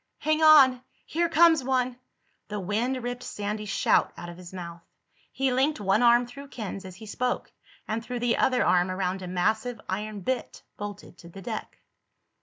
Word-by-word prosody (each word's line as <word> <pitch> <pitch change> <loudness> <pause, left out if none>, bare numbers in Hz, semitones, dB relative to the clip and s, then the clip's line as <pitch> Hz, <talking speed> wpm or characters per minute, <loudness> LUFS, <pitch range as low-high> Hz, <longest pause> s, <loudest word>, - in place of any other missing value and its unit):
"Hang 310 +1 0
on! 275 -5 +7 0.2
Here 340 +1 0
comes 325 -3 +5
one!" 255 -1 0 0.5
The 210 -1 -4
wind 230 +7 -1
ripped 245 0 -4
Sandy's 210 -2 -4
shout - - +2
out 175 - -7
of 170 - -10
his 180 -1 -11
mouth. 170 -2 -8 0.5
He 265 -1 0
linked 270 +3 +1
one 200 +2 +2
arm 240 0 +5
through 280 +4 -11
Ken's 210 -7 -6
as 185 -1 -9
he 220 +3 -11
spoke 245 +4 -2 0.4
and 225 +1 -2
threw 250 +1 -5
the 240 0 +1
other 255 -2 +2
arm 180 0 +3
around 185 0 -2
a 185 - -6
massive 220 +6 0
iron 210 +2 -4
bitt 260 +6 -3
bolted 205 -3 -8
to 170 - -12
the 195 +2 -11
deck. 220 +2 -6
220 Hz, 180 wpm, -27 LUFS, 195-255 Hz, 0.5 s, on